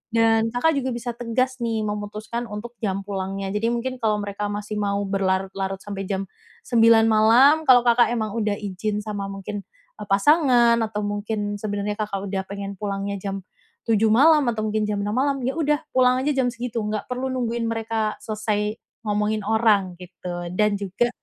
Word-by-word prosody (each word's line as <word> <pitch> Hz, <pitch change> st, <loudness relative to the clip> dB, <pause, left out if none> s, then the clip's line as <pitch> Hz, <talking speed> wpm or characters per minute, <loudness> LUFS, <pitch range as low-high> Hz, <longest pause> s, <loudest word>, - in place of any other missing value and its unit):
dan 225 Hz, 0 st, +4 dB
Kakak 310 Hz, +5 st, +2 dB
juga 260 Hz, 0 st, -2 dB
bisa 240 Hz, 0 st, -4 dB
tegas 255 Hz, +2 st, -1 dB
nih, 225 Hz, -2 st, -1 dB
memutuskan 210 Hz, +3 st, -4 dB
untuk 210 Hz, +3 st, -7 dB
jam 195 Hz, -1 st, -1 dB
pulangnya, 195 Hz, 0 st, -4 dB
jadi 215 Hz, +2 st, 0 dB
mungkin 255 Hz, +2 st, -3 dB
kalau 215 Hz, -2 st, +1 dB
mereka 205 Hz, +1 st, -3 dB
masih 205 Hz, +1 st, -4 dB
mau 200 Hz, 0 st, 0 dB
berlarut-larut 195 Hz, 0 st, -1 dB
sampai 195 Hz, -2 st, -5 dB
jam 195 Hz, 0 st, -2 dB, 0.4 s
09:00 230 Hz, -1 st, +5 dB
malam, 230 Hz, +7 st, +6 dB
kalau 245 Hz, -2 st, +7 dB
Kakak 240 Hz, 0 st, +5 dB
emang 215 Hz, -2 st, -2 dB
udah 210 Hz, -2 st, 0 dB
izin 205 Hz, +1 st, -3 dB
sama 205 Hz, -2 st, -4 dB
mungkin, 195 Hz, +1 st, -5 dB, 0.4 s
eee, 210 Hz, -, -7 dB
pasangan 240 Hz, +1 st, +4 dB
atau 215 Hz, -1 st, -2 dB
mungkin 205 Hz, 0 st, -3 dB
sebenernya 205 Hz, 0 st, -2 dB
Kakak 200 Hz, -2 st, -3 dB
udah 195 Hz, -, -1 dB
pengen 200 Hz, 0 st, -6 dB
pulangnya 200 Hz, -1 st, -3 dB
jam 195 Hz, -1 st, -5 dB, 0.4 s
07:00 225 Hz, -1 st, +3 dB
malam, 295 Hz, +3 st, +6 dB
atau 220 Hz, -2 st, -2 dB
mungkin 215 Hz, 0 st, 0 dB
jam 205 Hz, -1 st, -1 dB
06:00 205 Hz, -, -2 dB
malam, 275 Hz, +1 st, +1 dB
ya 260 Hz, -, +1 dB
udah, 300 Hz, -2 st, +1 dB
pulang 255 Hz, -1 st, +4 dB
aja 295 Hz, -, +1 dB
jam 265 Hz, -2 st, +1 dB
segitu. 240 Hz, -1 st, -4 dB
Nggak 210 Hz, 0 st, -3 dB
perlu 250 Hz, +1 st, -2 dB
nungguin 235 Hz, -2 st, -1 dB
mereka 225 Hz, -1 st, -1 dB
selesai 215 Hz, -1 st, -2 dB, 0.3 s
ngomongin 210 Hz, +1 st, 0 dB
orang, 210 Hz, -5 st, +2 dB
gitu, 175 Hz, -1 st, -7 dB
dan 210 Hz, +1 st, +2 dB
juga 200 Hz, +5 st, 0 dB
215 Hz, 170 wpm, -23 LUFS, 200-235 Hz, 0.4 s, kalau